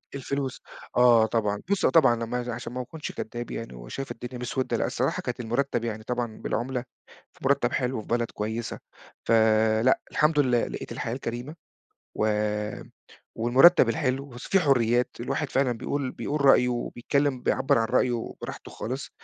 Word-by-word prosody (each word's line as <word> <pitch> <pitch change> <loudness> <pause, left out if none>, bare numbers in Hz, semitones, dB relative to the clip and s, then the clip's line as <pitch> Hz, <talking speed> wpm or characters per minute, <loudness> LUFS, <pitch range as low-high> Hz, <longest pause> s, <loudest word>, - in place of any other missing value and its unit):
الفلوس. 140 -1 -3 0.4
آه، 120 -2 +6
طبعًا. 105 -2 -1
بُص، 200 - +2
آه - - +5
طبعًا 135 -8 +5
لمّا 115 +2 -3
ي 120 - -6
عشان 120 +1 -6
ما 125 - -3
أكونش 155 +5 -7
كداب 120 +1 -6
يعني 115 - -6
وشايف - - -6
الدنيا 125 +2 -7
مسودة، 130 +1 -1
لأ، - - 0
الصراحة - - -1
كانت 125 0 -4
المرتب 120 +1 -1
يعني 110 -1 -4
طبعًا 120 -1 -3
بالعُملة، 125 +1 -2 0.5
فمرتب - - +1
حلو 125 0 0
وفي 110 - -7
بلد 120 0 0
كويسة. 110 +2 -4 0.5
فلأ، 110 +1 +4
الحمد 150 0 +3
لله 125 -4 +2
لقيت - - -7
الحياة 115 - -3
الكريمة، 125 +3 -5 0.6
و 110 - +1 1.1
والمرتب 130 +10 +6
الحلو. 140 -3 0
بُص، 125 -1 -10
في 195 - +4
حريات، 125 -5 +3
الواحد 135 +4 -2
فعلًا 135 -2 +2
بيقول 130 +3 -3
بيقول 145 0 -3
رأيه 125 -2 +6
وبيتكلم، 125 +2 -1
بيعبّر 130 - +2
عن 115 - +1
رأيه 125 +2 +2 0.3
وراحته - - -7
خالص، 130 +5 -5
125 Hz, 160 wpm, -26 LUFS, 115-135 Hz, 1.1 s, آه